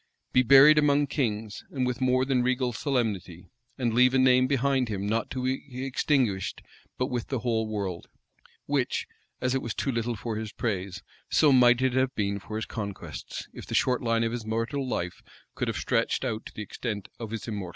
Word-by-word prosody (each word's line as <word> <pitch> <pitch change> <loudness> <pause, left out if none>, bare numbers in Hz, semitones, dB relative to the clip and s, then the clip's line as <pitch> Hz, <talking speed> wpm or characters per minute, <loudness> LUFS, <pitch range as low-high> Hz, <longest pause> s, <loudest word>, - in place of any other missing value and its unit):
Be 130 - +6
buried 140 +4 +8
among 145 -1 +3
kings, 110 -7 -2
and 130 -3 -1
with 125 0 -2
more 130 0 +3
than 130 -2 +2
regal 125 0 0
solemnity; 105 - -2 0.3
and 120 -3 0
leave 125 +2 +5
a - - +5
name 130 0 +5
behind 135 -2 +1
him 100 -2 -3
not 110 +2 -1
to 130 -1 -4
be 130 0 -3
extinguished 125 -7 0 0.3
but 125 - +1
with 120 -2 -2
the 130 -4 -2
whole 115 -3 0
world; 100 -5 -4 0.6
which 140 -3 0 0.4
as 125 0 +1
it 135 - 0
was 115 - -4
too 135 - -1
little 115 0 -1
for 110 0 -4
his 110 -1 -5
praise, 95 -4 -3 0.3
so 150 - +5
might 125 -1 +5
it 130 -1 +2
have 130 0 +1
been 100 -1 -1
for 105 +2 -8
his 110 - -2
conquests, 100 -3 -6
if - - -9
the - - -3
short 125 -1 +2
line 115 -1 +1
of 115 - 0
his 120 -1 -4
mortal 115 +5 -2
life 90 -7 -3 0.3
could - - -2
have - - -2
stretched - - 0
out 110 -3 -3
to - - -13
the 105 - -4
extent 105 -1 -5
of 115 -2 -5
his 115 +1 -5
immortal 100 -5 -4
designs?" - - -7
120 Hz, 205 wpm, -27 LUFS, 110-130 Hz, 0.6 s, buried